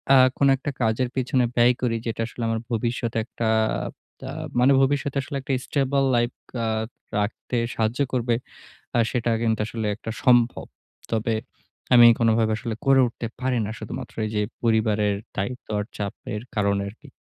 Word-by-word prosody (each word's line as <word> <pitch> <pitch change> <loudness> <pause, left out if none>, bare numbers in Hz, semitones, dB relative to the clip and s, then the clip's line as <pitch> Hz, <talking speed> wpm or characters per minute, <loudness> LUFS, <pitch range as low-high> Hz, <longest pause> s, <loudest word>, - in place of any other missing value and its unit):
আ - - +8 0.2
কোনো 140 -1 +4
একটা 140 +2 -4
কাজের 115 +3 +1
পিছনে 130 0 +1
ব্যয় 120 +1 +5
করি, 115 -2 +1
যেটা 115 0 -2
আসলে 120 - -9
আমার 115 - 0
ভবিষ্যতে 115 0 -1
একটা 115 -1 -3 0.8
আ - - -4 0.3
মানে 130 +3 +6
ভবিষ্যতে 140 0 +1
আসলে 140 +1 -5
একটা 135 +1 -2
স্টেবল 140 -1 +1
লাইফ 120 +1 +2 0.3
আ - - 0 0.5
রাখতে 105 +4 -2 0.2
সাহায্য 115 +4 0
করবে। 120 -2 +1 0.6
আ - - +4
সেটা 120 -2 0
কিন্তু 110 -2 +1
আসলে 110 -2 -3
একটা 115 +1 -6
সম্ভব। 120 -2 +4 0.5
তবে 115 0 0 0.6
আমি 120 -1 +9
কোনোভাবে 115 -1 +3
আসলে 115 -1 -4
করে 135 -1 +6
উঠতে 115 0 -5
পারি 130 -1 +1
না 105 - -4
শুধুমাত্র 110 - -7
এইযে 105 -1 -1 0.2
পরিবারের 110 -3 +2 0.2
দায়িত্ব 125 +6 -3
আর 105 - -2
চাপের 105 +1 -5
কারণে 100 -1 +1
আরকি। 120 +8 -15
115 Hz, 155 wpm, -24 LUFS, 110-125 Hz, 0.8 s, আমি